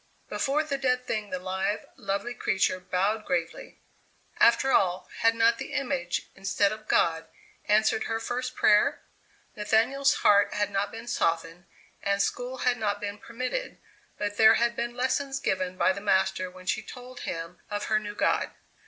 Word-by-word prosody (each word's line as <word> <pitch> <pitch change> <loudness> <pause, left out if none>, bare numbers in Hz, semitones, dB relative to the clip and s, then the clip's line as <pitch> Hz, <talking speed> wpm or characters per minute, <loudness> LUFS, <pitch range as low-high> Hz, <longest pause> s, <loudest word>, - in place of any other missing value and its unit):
Before 290 +3 0
the 280 -3 -3
dead 250 -1 +1
thing 215 -3 -3
the 185 - -2
live, 190 +3 -2
lovely 200 +5 -3
creature 190 -4 0
bowed 190 +4 0
gravely. 170 -4 -3 0.6
After 265 +3 +5
all, 185 -4 +2
had 230 0 +4
not 230 +1 +3
the - - -6
image, 175 -10 -1
instead 195 +1 +1
of 215 0 -8
God, 165 -1 +2 0.4
answered 215 +1 +2
her 225 0 -2
first 250 +2 -3
prayer? 215 +7 +3 0.5
Nathaniel's 225 +7 +2
heart 205 0 +5
had 205 0 0
not 200 +1 -1
been 225 +1 -8
softened 165 -5 -1 0.3
and 200 -1 0
school 245 +5 -1
had 245 -1 +3
not 205 -2 -1
been 205 0 -5
permitted, 255 - -4 0.4
but 205 0 -3
there 220 0 +7
had 235 0 +1
been 235 0 -3
lessons 270 +2 0
given 185 -6 -1
by 185 - +3
the 200 - -7
master 190 -2 +1
when 185 0 -14
she 220 - 0
told 250 +3 -10
him 165 +1 -5
of 205 0 -3
her 215 0 +2
new 205 -1 -7
god. - - +1
210 Hz, 165 wpm, -27 LUFS, 190-240 Hz, 0.6 s, there